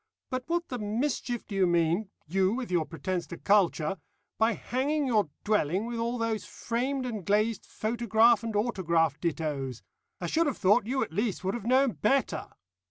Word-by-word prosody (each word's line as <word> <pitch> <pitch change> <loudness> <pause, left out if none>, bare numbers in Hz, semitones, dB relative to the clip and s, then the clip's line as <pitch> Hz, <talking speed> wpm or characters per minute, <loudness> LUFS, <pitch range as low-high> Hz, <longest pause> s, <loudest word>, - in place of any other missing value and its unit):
But 255 0 -2
what 345 0 -1
the 250 - -4
mischief 240 +3 -2
do - - -9
you 195 -2 +3
mean 175 +4 +1 0.2
you, 190 +4 +1
with 250 -6 -4
your 170 -3 +1
pretence 175 +1 -3
to 170 - -7
culture 195 -3 +2 0.4
by 225 +1 +4
hanging 280 +7 -1
your 215 - +2
dwelling 200 -1 +1
with 235 0 -4
all 235 +2 -1
those 230 -2 -1
framed 255 +3 -2
and 220 -6 -4
glazed 210 +3 +1
photograph 230 0 +3
and 225 -2 -3
autograph 170 - +1
dittoes? 145 -7 -2 0.4
I 175 - -4
should 325 - +2
have 275 - -1
thought 205 +2 +3
you 265 +2 +1
at - - -7
least 210 +1 -1
would 190 +1 0
have 230 -3 -5
known 260 +1 +4
better. 215 - 0
215 Hz, 175 wpm, -29 LUFS, 180-240 Hz, 0.4 s, by